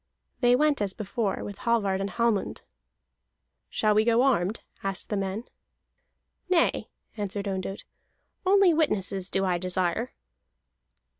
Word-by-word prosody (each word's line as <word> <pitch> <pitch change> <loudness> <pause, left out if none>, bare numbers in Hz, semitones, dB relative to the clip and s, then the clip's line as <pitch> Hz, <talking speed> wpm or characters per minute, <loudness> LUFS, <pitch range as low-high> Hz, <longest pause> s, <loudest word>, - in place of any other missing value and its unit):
They 245 -1 +5
went 295 -2 +2
as 195 -2 -1
before, 215 -1 -2
with 205 - -7
Hallvard 200 -5 +1
and 195 - -2
Hallmund. 225 0 0 1.1
"Shall 215 -1 +2
we 215 +1 +4
go 235 +2 +3
armed?" 220 -6 +1 0.2
asked 195 -2 -3
the 210 - -1
men. 195 +2 -2 1.1
"Nay," 355 -3 +2 0.3
answered 205 0 -3
Ondott, 195 0 -4 0.6
"only 385 -2 +5
witnesses 200 - 0
do 195 0 0
I 180 -2 +1
desire." 185 +5 -1
205 Hz, 125 wpm, -27 LUFS, 190-240 Hz, 1.1 s, They